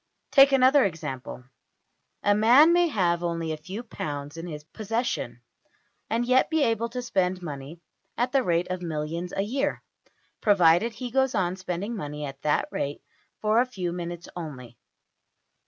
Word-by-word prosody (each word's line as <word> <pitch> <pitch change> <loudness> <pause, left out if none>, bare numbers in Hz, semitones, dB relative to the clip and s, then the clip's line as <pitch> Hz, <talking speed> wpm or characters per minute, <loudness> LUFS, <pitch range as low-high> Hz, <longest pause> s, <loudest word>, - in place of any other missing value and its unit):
Take 275 0 +7
another 270 +1 +5
example. 135 -8 -4 0.8
A 205 - +4
man 245 +10 +6
may 350 0 +4
have 175 - +1
only 165 -2 -2
a - - -1
few 185 +9 -7
pounds 145 -9 -6
in 165 +1 -6
his 150 -3 -7
possession, 225 +8 -3 0.7
and 230 +2 0
yet 255 +1 +3
be 320 -2 +2
able 230 -1 0
to 250 +1 -5
spend 185 -5 0
money 145 +1 -7 0.4
at 245 +2 0
the 275 - +3
rate 175 -4 0
of 185 -1 -3
millions 165 +1 -4
a 195 - -1
year 275 +7 -2 0.6
provided 200 +2 +4
he 245 +2 -6
goes 265 -1 +2
on 185 -2 0
spending 190 +4 -4
money 150 -5 -5
at 135 0 -8
that 150 - +1
rate 140 +1 -3 0.4
for 215 +2 +3
a - - +2
few 185 -8 -4
minutes 175 -1 -6
only. 135 -8 -8
185 Hz, 160 wpm, -26 LUFS, 165-240 Hz, 0.8 s, Take